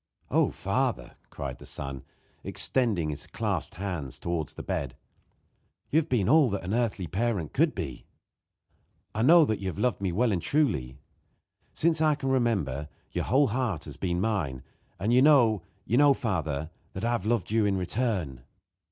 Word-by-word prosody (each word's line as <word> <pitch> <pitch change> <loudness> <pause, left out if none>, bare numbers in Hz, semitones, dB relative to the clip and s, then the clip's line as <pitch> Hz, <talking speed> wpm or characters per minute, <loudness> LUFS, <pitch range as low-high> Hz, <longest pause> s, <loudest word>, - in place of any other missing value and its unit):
"Oh, - - +4
my - - -5
father!" - - -2
cried 65 -3 -6
the - - -12
son, 70 -1 -5 0.4
extending 105 -12 0
his 70 - -7
clasped - - -3
hands 85 -9 -4
towards 85 -3 -3
the - - -7
bed. 70 -2 -3 1.0
"You 155 - +5
have 160 0 -4
been 110 -7 +1
all 150 -2 +5
that 100 -3 -3
an 95 +4 -3
earthly 115 -6 0
parent 95 -1 -1
could - - +2
be. - - -6 1.1
I 110 - -1
know 160 +6 +7
you 100 -3 -2
have 90 - -4
loved 125 -5 0
me 95 -2 0
well 115 +6 +2
and 90 -4 0
truly. 90 - 0 0.8
Since 160 -1 +3
I 155 -1 +4
can 135 -2 -3
remember 100 - 0 0.2
your - - -2
whole 140 0 +3
heart 115 - -1
has - - -9
been 85 -2 -1
mine; 90 - -1 0.3
and 110 +6 0
you 125 - +6
know, 125 - +5 0.2
you 120 - +1
know, 145 0 +6
father, 80 - -2 0.2
that 95 +4 -4
I 120 - +1
have 115 -4 -1
loved 110 -5 0
you 110 -2 +3
in 100 -1 +1
return." 90 - -2
105 Hz, 175 wpm, -28 LUFS, 80-125 Hz, 1.1 s, know